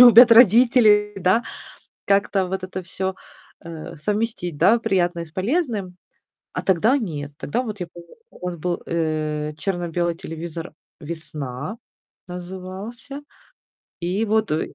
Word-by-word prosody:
любят 240 Hz, 0 st, +10 dB
родители, 220 Hz, -2 st, +6 dB
да? 190 Hz, +5 st, +3 dB, 0.6 s
Как-то, 200 Hz, -1 st, +2 dB
вот 190 Hz, 0 st, -3 dB
это 185 Hz, 0 st, -5 dB
всё, 190 Hz, +1 st, -3 dB, 0.5 s
э, 165 Hz, -1 st, -8 dB
совместить, 205 Hz, -1 st, -2 dB
да, 195 Hz, +10 st, +5 dB
приятное 175 Hz, -5 st, 0 dB
с 155 Hz, -, -19 dB
полезным. 205 Hz, -, -1 dB, 0.6 s
А -, -, -2 dB
тогда 215 Hz, +9 st, +3 dB
нет. 150 Hz, -, -4 dB
Тогда 240 Hz, -, -1 dB
вот, 215 Hz, -4 st, -6 dB
я 180 Hz, -, -4 dB
помню, 170 Hz, -, -13 dB, 0.2 s
у 180 Hz, -, -5 dB
нас 175 Hz, -, -6 dB
был, 175 Hz, +2 st, -2 dB
э, 155 Hz, -2 st, -1 dB
черно-белый 175 Hz, -2 st, -1 dB
телевизор, 165 Hz, 0 st, -7 dB, 0.3 s
"Весна" 155 Hz, -, -6 dB, 0.5 s
назывался. 190 Hz, +9 st, -7 dB, 0.8 s
И 185 Hz, +6 st, 0 dB
вот, 220 Hz, -2 st, +1 dB
ой 155 Hz, -, -2 dB
185 Hz, 125 wpm, -23 LUFS, 170-215 Hz, 0.8 s, любят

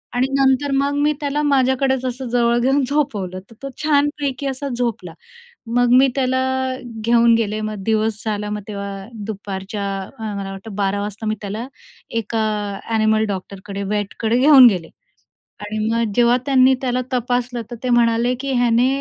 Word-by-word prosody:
आणि 255 Hz, +2 st, +2 dB
नंतर 270 Hz, +1 st, +2 dB
मग, 280 Hz, +1 st, +1 dB
मी 295 Hz, +1 st, +2 dB
त्याला 290 Hz, +1 st, -1 dB
माझ्याकडेच 265 Hz, -1 st, +2 dB
असं 250 Hz, 0 st, -4 dB
जवळ 235 Hz, 0 st, +2 dB
घेऊन 270 Hz, +3 st, +2 dB
झोपवलं, 205 Hz, -11 st, -1 dB
तर -, -, -14 dB
तो 275 Hz, -, -4 dB
छानपैकी 290 Hz, -2 st, 0 dB
असा 270 Hz, +1 st, -3 dB
झोपला. 230 Hz, -8 st, -3 dB, 0.6 s
मग 245 Hz, 0 st, +3 dB
मी 270 Hz, -, +5 dB
त्याला 260 Hz, -1 st, +1 dB, 0.6 s
घेऊन 235 Hz, 0 st, +5 dB
गेले, 215 Hz, -1 st, -1 dB
मग 215 Hz, -2 st, -5 dB
दिवस 220 Hz, -1 st, 0 dB
झाला, 210 Hz, -1 st, -2 dB
मग 210 Hz, -, -3 dB
तेव्हा 200 Hz, -1 st, -6 dB, 0.2 s
दुपारच्या, 200 Hz, 0 st, -5 dB, 0.3 s
अ, -, -, -6 dB
मला 195 Hz, -1 st, -5 dB
वाटतं 195 Hz, +2 st, -9 dB
12 200 Hz, 0 st, 0 dB
वाजता 210 Hz, +2 st, -5 dB
मी 215 Hz, -, 0 dB
त्याला 215 Hz, +5 st, -5 dB, 0.5 s
1का 225 Hz, +1 st, -3 dB, 0.4 s
अ, -, -, -8 dB
ॲनिमल 220 Hz, 0 st, +2 dB
डॉक्टरकडे, 195 Hz, +1 st, -7 dB
वेटकडे 210 Hz, +3 st, -1 dB
घेऊन 270 Hz, -2 st, +8 dB
गेले. 180 Hz, -7 st, 0 dB, 0.7 s
आणि 210 Hz, +1 st, -5 dB
मग 230 Hz, -2 st, 0 dB
जेव्हा 240 Hz, 0 st, +4 dB
त्यांनी 265 Hz, -1 st, +5 dB
त्याला 255 Hz, -1 st, 0 dB
तपासलं, 245 Hz, 0 st, -1 dB
तर 240 Hz, -, -4 dB
ते 255 Hz, -, -1 dB
म्हणाले, 235 Hz, 0 st, +3 dB
की 275 Hz, -1 st, -3 dB
“ह्याने 245 Hz, 0 st, +3 dB
235 Hz, 160 wpm, -20 LUFS, 210-260 Hz, 0.7 s, घेऊन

